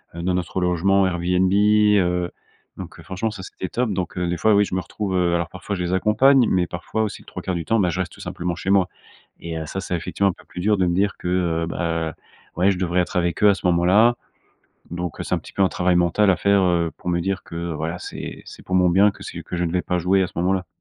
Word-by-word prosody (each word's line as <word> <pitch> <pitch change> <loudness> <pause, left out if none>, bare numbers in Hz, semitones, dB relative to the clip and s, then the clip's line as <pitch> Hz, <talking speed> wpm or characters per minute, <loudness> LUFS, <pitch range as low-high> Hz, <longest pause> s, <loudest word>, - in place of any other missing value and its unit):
heu, 85 - -5
dans 90 - 0
notre 90 +1 -2
logement 95 +2 +2
Airbnb, 90 +1 +1
heu 100 -4 +3 0.4
donc, - - -9
heu, - - -11
franchement, 95 +4 -3
ça, 100 -3 -8
c'était 95 - -6
top. 120 -2 -1
Donc, 90 -1 -4
heu, 90 - 0
des 85 - -1
fois, 110 +3 +3
oui, 105 - +4
je 95 - -8
me 95 - 0
retrouve, 100 -1 -4
heu, 90 -1 +2
alors 85 -2 -1
parfois 95 +2 -5
je 90 - -3
les 90 +1 -1
accompagne, 125 +7 +4
mais 90 -1 +2
parfois 90 +6 -3
aussi, 105 - -4
les - - -20
3/4 95 - -4
du 85 - -4
temps, 115 +4 +2
bah 90 - +2
je 85 +2 -3
reste 90 -2 -2
tout - - -16
simplement 85 -1 -4
chez 95 - -2
moi 95 -2 +3 0.5
et 85 -1 -5
heu, 80 - -5
ça, 95 - -4
c'est 90 - -3
effectivement 95 +3 0
un - - -2
peu - - -19
plus - - -10
dur 105 +2 +3
de 90 -2 +2
me 85 - 0
dire 100 +2 +1
que, - - -6
heu, 85 -2 0
bah, 80 -2 -2 0.4
ouais, 95 +3 +4
je 90 - -3
devrais 90 0 +1
être 90 - -5
avec 85 +2 0
eux 105 - +8
à - - +5
ce - - -10
moment-là 95 +7 +4 0.8
donc, 85 0 -5
heu, - - -3
c'est - - -1
un - - 0
petit - - -13
peu 100 - 0
un 95 - +4
travail 90 0 +1
mental 90 +4 +3
à 90 - +3
faire, 100 +1 +3
heu, 85 -2 +2
pour - - -7
me 85 0 0
dire 95 +2 -2
que 85 0 -5
voilà, 80 +3 -3
c'est - - -7
c'est - - -12
pour 95 - -3
mon 90 -1 +4
bien 100 +4 +5
que - - -14
c'est - - -7
que - - -8
je 90 - -1
ne 85 - -1
vais 90 0 0
pas 90 - -1
jouer 95 +3 +2
à - - +1
ce - - -18
moment-là. 90 +1 0
90 Hz, 280 wpm, -22 LUFS, 85-100 Hz, 0.8 s, eux